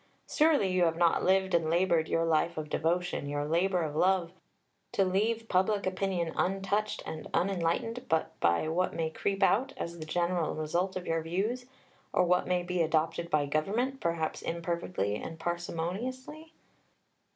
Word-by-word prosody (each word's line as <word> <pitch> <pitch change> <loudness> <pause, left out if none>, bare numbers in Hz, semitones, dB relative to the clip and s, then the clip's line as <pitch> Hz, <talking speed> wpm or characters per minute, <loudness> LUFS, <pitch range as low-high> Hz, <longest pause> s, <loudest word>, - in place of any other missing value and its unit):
Surely 300 -11 +3
you 180 -1 +3
have 165 0 0
not 170 -1 +3
lived 190 0 +2
and 165 -2 +2
laboured 170 -1 +2
your 165 0 +2
life 165 +1 +1
of 150 -1 -5
devotion, 170 -2 0
your 145 0 -1
labour 175 +3 +1
of 150 -2 -4
love, 180 0 +2 0.6
to 195 - +2
leave 220 +5 0
public 195 +2 +1
opinion 185 -3 -1
untouched 195 +3 0
and 155 - -6
unenlightened 195 +7 0
but 160 - +1
by 85 - +2
what 175 +3 0
may 160 -1 -1
creep 195 +3 -1
out, 260 +8 +3
as 170 0 -5
the 155 - -6
general 175 0 0
result 170 +5 -1
of 185 -1 -4
your 165 0 0
views, 205 +10 -2 0.5
or - - +4
what 180 0 +2
may 180 -1 +1
be 180 0 -1
adopted 165 +1 0
by 150 -3 +2
Government, 215 - -1
perhaps 165 -4 -1
imperfectly 170 - -2
and 165 - -7
parsimoniously? 220 - -4
175 Hz, 160 wpm, -30 LUFS, 165-195 Hz, 0.6 s, or